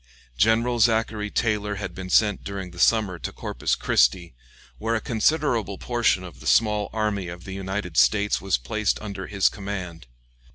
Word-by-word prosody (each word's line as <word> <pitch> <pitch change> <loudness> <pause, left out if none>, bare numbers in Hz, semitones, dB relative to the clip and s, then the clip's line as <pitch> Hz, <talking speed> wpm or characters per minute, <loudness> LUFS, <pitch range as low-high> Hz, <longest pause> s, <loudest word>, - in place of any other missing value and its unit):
General 115 - +2
Zachary 110 -2 +2
Taylor 105 -2 -1
had 95 -3 -5
been 95 0 -7
sent 105 +1 +3
during 95 -2 -6
the 90 - -12
summer 100 -4 +2
to - - -5
Corpus - - -2
Christi, 80 +7 +2 0.5
where 115 +1 0
a - - +1
considerable 115 -3 0
portion 120 -6 +1
of 90 -4 -11
the - - -8
small 105 -2 +3
army 105 -4 -1
of 85 0 -8
the 95 - -7
United 95 -3 -4
States 100 +13 +3
was 95 -6 +1
placed 100 - -1
under 100 -3 -6
his 100 -2 +2
command. 90 - -5
100 Hz, 165 wpm, -24 LUFS, 90-110 Hz, 0.5 s, sent